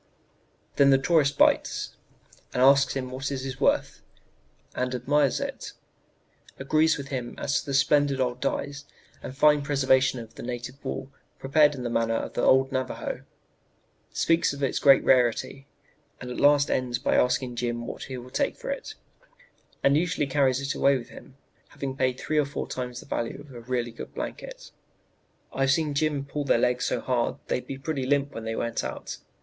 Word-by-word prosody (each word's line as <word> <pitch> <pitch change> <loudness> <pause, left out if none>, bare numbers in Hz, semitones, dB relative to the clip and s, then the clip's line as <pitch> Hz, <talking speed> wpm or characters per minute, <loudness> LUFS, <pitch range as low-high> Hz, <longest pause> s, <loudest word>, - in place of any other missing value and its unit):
"Then 140 -1 +6
the 135 - +6
tourist 145 0 +2
'bites,' - - +2 0.6
and 125 - +3
asks 140 0 +5
him 130 -2 -3
what 135 +2 -4
it 135 -1 -4
is 130 -2 -6
worth, - - +1 0.7
and 125 0 -2
admires 140 +2 +1
it, - - -5 0.8
agrees 155 +3 +2
with 140 -1 -7
him 125 -4 -4
as 135 - 0
to - - -10
the 140 - -3
splendid 140 0 +3
old 125 -1 -1
dyes 145 0 -3 0.4
and 130 - -8
fine 150 0 +5
preservation 135 -2 +2
of 115 -1 -10
the - - -10
native 125 +2 -6
wool 135 0 -5 0.3
prepared 150 +2 +3
in 125 - -6
the 120 - -2
manner 115 -1 +1
of - - -3
the - - -1
old 130 +1 +4
Navajo, 130 -1 -4 0.9
speaks 165 -3 +2
of 140 0 -6
its 135 - 0
great 135 -2 +6
rarity, 130 +2 +2 0.5
and 125 - -7
at 125 - -5
last 145 0 +4
ends 125 -2 0
by 125 - 0
asking 125 0 +1
Jim 120 -1 -2
what - - -6
he 130 -1 -6
will 125 +1 -10
take 280 - -1
for - - -5
it, - - -6 0.9
and 140 +1 +4
usually 165 -1 +1
carries 135 -2 +2
it 140 +1 -2
away 140 -1 +3
with 120 - -9
him, 135 - -14 0.3
having 135 -1 -6
paid 130 -1 0
three 155 0 0
or 150 - +2
four 140 - -5
times 125 -1 -5
the - - -14
value 115 +3 -3
of 145 -2 -13
a 120 - -9
really 120 0 -2
good 115 - -10
blanket. - - -7 0.8
"I've 135 0 +1
seen 150 +1 +1
Jim 145 -1 0
pull 145 +1 -4
their 140 - +3
legs 125 +1 +1
so - - -1
hard 120 -2 0
they'd 125 - -2 0.2
pretty 145 -1 -2
near 130 - -3
limp 145 0 +1
when 115 - -7
they 115 0 -3
went 115 - -2
out. 65 - -6
135 Hz, 190 wpm, -26 LUFS, 125-145 Hz, 0.9 s, Then